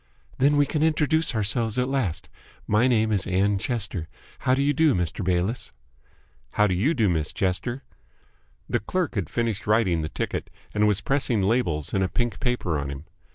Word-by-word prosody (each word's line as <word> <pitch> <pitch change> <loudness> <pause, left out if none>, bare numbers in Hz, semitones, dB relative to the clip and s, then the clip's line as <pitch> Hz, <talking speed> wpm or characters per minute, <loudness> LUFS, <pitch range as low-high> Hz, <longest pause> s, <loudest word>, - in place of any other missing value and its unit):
"Then 145 +3 +4
we 145 - +4
can 150 +1 -2
introduce 160 -2 +2
ourselves 110 +2 +1
at 125 - +2
last. 130 -12 -2 0.4
My 110 +4 +3
name 110 -3 +2
is 100 -3 0
Ann 100 +2 +1
Chester. 100 -8 -2 0.3
How 130 -1 +2
do 140 - +1
you 145 +1 +2
do, 155 0 +3
Mr. 90 +2 -2
Bayliss?" 90 +6 -1 0.8
"How 105 - +4
do 95 - +1
you 125 - +1
do, 110 -4 +2
Miss 80 -4 0
Chester?" 120 +8 -2 0.8
The - - 0
clerk 175 - -2
had 100 -9 -2
finished 115 -5 -2
writing 105 -6 +2
the 75 - -3
ticket, - - -4 0.2
and 105 0 +3
was 105 -1 +1
pressing 130 -7 0
labels 95 - 0
and 95 - +2
a 95 - 0
pink 120 -1 -2
paper 105 - -1
on 70 0 -4
him. 70 +2 -7
110 Hz, 185 wpm, -25 LUFS, 95-130 Hz, 0.8 s, Then